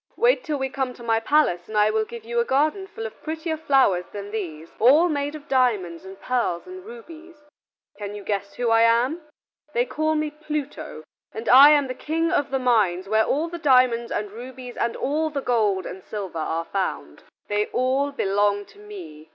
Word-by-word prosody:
Wait -, -, +3 dB
till 305 Hz, -3 st, -2 dB
we 265 Hz, -1 st, -1 dB
come 265 Hz, -1 st, -3 dB
to 240 Hz, -, -13 dB
my 225 Hz, -1 st, +2 dB
palace 225 Hz, -, +1 dB
and 215 Hz, -, -3 dB
I 210 Hz, 0 st, +4 dB
will 220 Hz, 0 st, 0 dB
give 235 Hz, 0 st, -9 dB
you 235 Hz, +1 st, -1 dB
a -, -, +3 dB
garden 305 Hz, +10 st, 0 dB
full 450 Hz, +3 st, -7 dB
of -, -, -9 dB
prettier 320 Hz, +1 st, -3 dB
flowers 270 Hz, -, +2 dB
than 205 Hz, 0 st, -7 dB
these, 165 Hz, -7 st, -6 dB
all 285 Hz, +10 st, +6 dB
made 290 Hz, -2 st, -2 dB
of 295 Hz, -1 st, -11 dB
diamonds 210 Hz, -11 st, +1 dB
and 190 Hz, +1 st, -11 dB
pearls 235 Hz, -9 st, -1 dB
and 370 Hz, 0 st, -10 dB
rubies. 350 Hz, -7 st, -12 dB, 0.6 s
Can 205 Hz, 0 st, -5 dB
you 205 Hz, -, -8 dB
guess 200 Hz, 0 st, -3 dB
who 240 Hz, -2 st, 0 dB
I 225 Hz, 0 st, +5 dB
am? 240 Hz, +8 st, +3 dB, 0.5 s
They 240 Hz, +1 st, +2 dB
call 310 Hz, +5 st, -1 dB
me 305 Hz, -1 st, -1 dB
Pluto, 300 Hz, -, -6 dB, 0.3 s
and 220 Hz, +1 st, -7 dB
I 275 Hz, +3 st, +9 dB
am 295 Hz, -2 st, +4 dB
the 255 Hz, -, -4 dB
King 325 Hz, +5 st, -1 dB
of 290 Hz, -5 st, +1 dB
the 270 Hz, -, 0 dB
mines 210 Hz, -8 st, +1 dB
where 220 Hz, +1 st, +3 dB
all 310 Hz, +4 st, 0 dB
the 340 Hz, 0 st, -7 dB
diamonds 250 Hz, -5 st, +3 dB
and 210 Hz, -1 st, -3 dB
rubies 250 Hz, +2 st, -9 dB
and 235 Hz, -, -1 dB
all 310 Hz, +3 st, -1 dB
the 290 Hz, -2 st, -3 dB
gold 215 Hz, -8 st, +1 dB
and 190 Hz, -, -8 dB
silver 195 Hz, -6 st, -6 dB
are 165 Hz, +1 st, -2 dB
found: 195 Hz, +1 st, -4 dB, 0.3 s
they 210 Hz, 0 st, 0 dB
all 265 Hz, +3 st, 0 dB
belong 205 Hz, -4 st, +1 dB
to -, -, -19 dB
me. 165 Hz, -7 st, -11 dB
245 Hz, 200 wpm, -24 LUFS, 205-300 Hz, 0.6 s, I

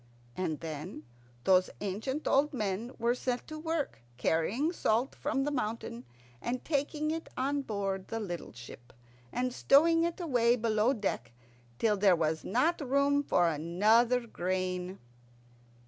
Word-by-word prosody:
And 165 Hz, -5 st, -2 dB
then 155 Hz, +1 st, -6 dB, 0.4 s
those 185 Hz, +2 st, +4 dB
ancient 220 Hz, +9 st, -3 dB
old 285 Hz, +1 st, +3 dB
men 215 Hz, +1 st, -2 dB
were 235 Hz, +1 st, +2 dB
set 250 Hz, 0 st, -2 dB
to 310 Hz, 0 st, -6 dB
work 315 Hz, -, -2 dB, 0.2 s
carrying 205 Hz, -, +1 dB
salt 240 Hz, -4 st, +1 dB
from 275 Hz, -2 st, -1 dB
the 295 Hz, -, -1 dB
mountain 215 Hz, -, -3 dB, 0.4 s
and 245 Hz, +1 st, -3 dB
taking 300 Hz, +1 st, 0 dB
it 325 Hz, 0 st, -4 dB
on 280 Hz, +2 st, 0 dB
board 195 Hz, -5 st, -3 dB
the 225 Hz, -, -3 dB
little 175 Hz, -6 st, -5 dB
ship, 120 Hz, +1 st, -12 dB, 0.4 s
and 250 Hz, 0 st, -1 dB
stowing 330 Hz, +6 st, +5 dB
it 340 Hz, +2 st, -1 dB
away 245 Hz, -8 st, +3 dB
below 220 Hz, 0 st, +2 dB
deck 160 Hz, -, -3 dB, 0.4 s
till 210 Hz, -, +2 dB
there 195 Hz, -2 st, +5 dB
was 160 Hz, -1 st, 0 dB
not 315 Hz, +8 st, +1 dB
room 280 Hz, +1 st, +2 dB
for 175 Hz, -10 st, +2 dB
another 215 Hz, +10 st, +3 dB
grain. 185 Hz, -2 st, -2 dB
230 Hz, 140 wpm, -31 LUFS, 185-275 Hz, 0.4 s, stowing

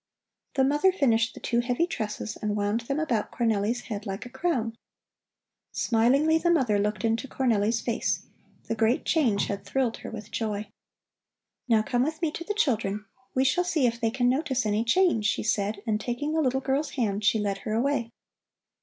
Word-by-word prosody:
The 265 Hz, -, +3 dB
mother 295 Hz, +7 st, +4 dB
finished 235 Hz, -8 st, +2 dB
the -, -, -8 dB
two 235 Hz, -, 0 dB
heavy 245 Hz, +7 st, +1 dB
tresses 215 Hz, -8 st, -4 dB
and 210 Hz, -1 st, -2 dB
wound 205 Hz, +2 st, 0 dB
them 275 Hz, +6 st, -2 dB
about 240 Hz, -9 st, -1 dB
Cornelli's 225 Hz, 0 st, 0 dB
head 210 Hz, -1 st, -6 dB
like 195 Hz, +4 st, -4 dB
a 245 Hz, -, -10 dB
crown. 245 Hz, -11 st, -1 dB, 1.0 s
Smilingly 275 Hz, +8 st, +3 dB
the 345 Hz, -, +1 dB
mother 255 Hz, -12 st, +3 dB
looked 210 Hz, +2 st, -1 dB
into 225 Hz, +4 st, 0 dB
Cornelli's 230 Hz, -4 st, +1 dB
face. 235 Hz, 0 st, -1 dB, 0.4 s
The -, -, -3 dB
great 225 Hz, +2 st, +1 dB
change 245 Hz, -11 st, +2 dB
had 200 Hz, -1 st, -4 dB
thrilled 240 Hz, +3 st, -1 dB
her -, -, -8 dB
with 215 Hz, -1 st, -8 dB
joy. 210 Hz, -2 st, -3 dB, 1.0 s
"Now 225 Hz, -3 st, +4 dB
come 245 Hz, +1 st, 0 dB
with 310 Hz, +4 st, -1 dB
me 330 Hz, -3 st, 0 dB
to 335 Hz, -, -6 dB
the 415 Hz, +4 st, -3 dB
children. 215 Hz, -, 0 dB, 0.3 s
We 260 Hz, -, +3 dB
shall 355 Hz, +7 st, +3 dB
see 325 Hz, -6 st, +1 dB
if 235 Hz, -1 st, 0 dB
they 225 Hz, -, +2 dB
can 245 Hz, +1 st, +1 dB
notice 265 Hz, -2 st, +1 dB
any 210 Hz, +1 st, +1 dB
change," 235 Hz, -, +3 dB
she -, -, 0 dB
said, 205 Hz, -1 st, -1 dB
and 215 Hz, -2 st, 0 dB
taking 275 Hz, +5 st, -2 dB
the 320 Hz, -, +2 dB
little 265 Hz, -1 st, +1 dB
girl's 280 Hz, +3 st, -1 dB
hand, 210 Hz, -5 st, -1 dB
she 205 Hz, -, +4 dB
led 200 Hz, -2 st, -1 dB
her 215 Hz, -, -4 dB
away. 235 Hz, 0 st, 0 dB
235 Hz, 190 wpm, -27 LUFS, 215-270 Hz, 1.0 s, mother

